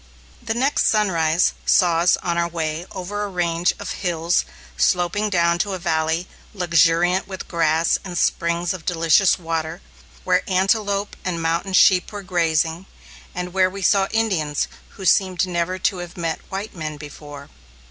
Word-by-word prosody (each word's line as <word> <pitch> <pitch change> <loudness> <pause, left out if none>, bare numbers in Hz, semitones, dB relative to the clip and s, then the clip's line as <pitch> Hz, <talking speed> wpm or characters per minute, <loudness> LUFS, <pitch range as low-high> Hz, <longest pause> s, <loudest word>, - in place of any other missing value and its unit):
The 225 -2 -3
next 270 +4 +2
sunrise 170 -6 +2
saw 175 -4 +3
us 175 +1 +4
on 170 -1 -1
our 170 0 +1
way 165 0 -4
over 195 +3 -5
a 205 - -2
range 175 -1 0
of - - -6
hills 170 -2 0 0.3
sloping 180 +4 +1
down 170 -3 +2
to 200 +1 -1
a - - -2
valley 165 0 -1 0.3
luxuriant 175 +1 +2
with 190 -1 -7
grass 165 -1 +1
and 180 -2 -6
springs 170 +2 0
of 180 -3 -8
delicious 170 +2 +3
water, 165 -1 -3 0.4
where - - +2
antelope 200 +2 0
and 180 -2 -2
mountain 165 +4 -1
sheep 185 -1 +5
were 205 -1 -7
grazing, 165 -1 0 0.5
and 180 0 -4
where 185 -1 +3
we 195 +1 -7
saw 195 +1 +3
Indians 185 -10 0 0.3
who 190 - -7
seemed 185 0 +3
never 180 0 -2
to 190 +1 0
have 175 0 -8
met 165 -2 -2
white 195 +3 -5
men 155 -3 -5
before. 145 -1 -11
175 Hz, 155 wpm, -21 LUFS, 165-190 Hz, 0.5 s, sheep